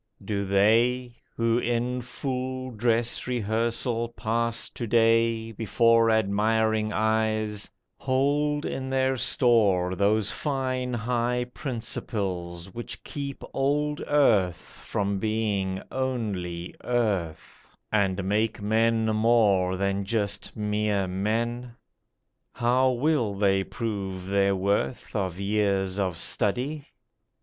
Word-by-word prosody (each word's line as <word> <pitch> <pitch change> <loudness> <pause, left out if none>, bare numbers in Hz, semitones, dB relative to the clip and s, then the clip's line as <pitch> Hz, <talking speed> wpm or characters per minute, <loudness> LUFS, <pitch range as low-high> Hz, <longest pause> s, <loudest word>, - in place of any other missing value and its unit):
Do 100 -1 -1
they, 115 +6 +3 0.2
Who 115 0 +2
in 120 +1 -1
full 130 +1 -4
dress 115 +1 0
rehearsal 115 0 -1
pass 115 0 -1
to 120 - -5
day 115 0 +3
Before 115 +1 +3
admiring 110 +1 +2
eyes, 110 -1 0 0.3
hold 145 +3 +1
in 130 0 -3
their 130 0 +1
store 115 -7 +3
Those 105 +2 +2
fine 130 -3 -2
high 120 +1 0
principles 95 - -4
which 120 0 -7
keep 140 -1 -6
old 150 +2 0
Earth 105 - +3 0.3
From 100 -1 -1
being 105 -3 -1
only 100 -10 -3
earth; 100 -10 -2
and 95 -2 +1
make 105 +3 0
men 110 +2 +2
more 110 -4 +3
Than 100 +1 0
just 100 +1 -2
mere 105 -1 0
men? 115 +6 -2 0.8
How 125 +2 +2
will 125 -4 +1
they 95 -1 +2
prove 95 -5 -4
their 100 0 +2
worth 100 +7 -1
Of 95 -3 -2
years 100 -1 0
of 90 -4 -1
study? 135 - 0
110 Hz, 105 wpm, -26 LUFS, 100-120 Hz, 0.8 s, they